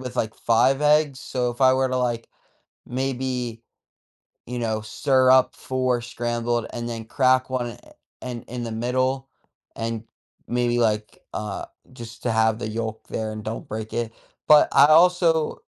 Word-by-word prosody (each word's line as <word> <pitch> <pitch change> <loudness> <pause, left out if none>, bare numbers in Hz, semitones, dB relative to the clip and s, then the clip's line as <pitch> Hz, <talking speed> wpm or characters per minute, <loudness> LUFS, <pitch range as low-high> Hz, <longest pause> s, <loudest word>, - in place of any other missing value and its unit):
with, 125 -1 -7
like, 110 -2 -1
5 130 +4 +2
eggs. 150 -2 +3
So, 125 -2 -2
if 120 +2 -11
I 130 0 +6
were 130 0 +1
to, 130 - -1
like, 120 -2 -1 0.6
maybe, 125 -2 -3 0.9
you 125 +1 -4
know, 110 -2 -1
stir 130 +4 +2
up 130 0 +5
4 130 -2 -1
scrambled, 120 -1 -2
and 120 0 -4
then 115 -1 -5
crack 130 +2 +2
1 120 -3 -2 0.5
in 120 -2 -5
in 120 0 -6
the 115 - -5
middle, 130 +3 -1 0.5
and 115 -1 -3 0.4
maybe, 120 0 +1
like, 110 -2 0 0.2
uh, 105 -2 -4 0.3
just 115 -2 -10
to 120 - +1
have 110 0 +2
the 110 - -4
yolk 110 0 -4
there 110 -1 -3
and 110 -1 -7
don't 110 +1 -5
break 110 0 -5
it. 115 -1 -2 0.4
But 150 -1 +7
I 140 - +7
also, 165 0 +4
120 Hz, 160 wpm, -24 LUFS, 115-130 Hz, 0.9 s, But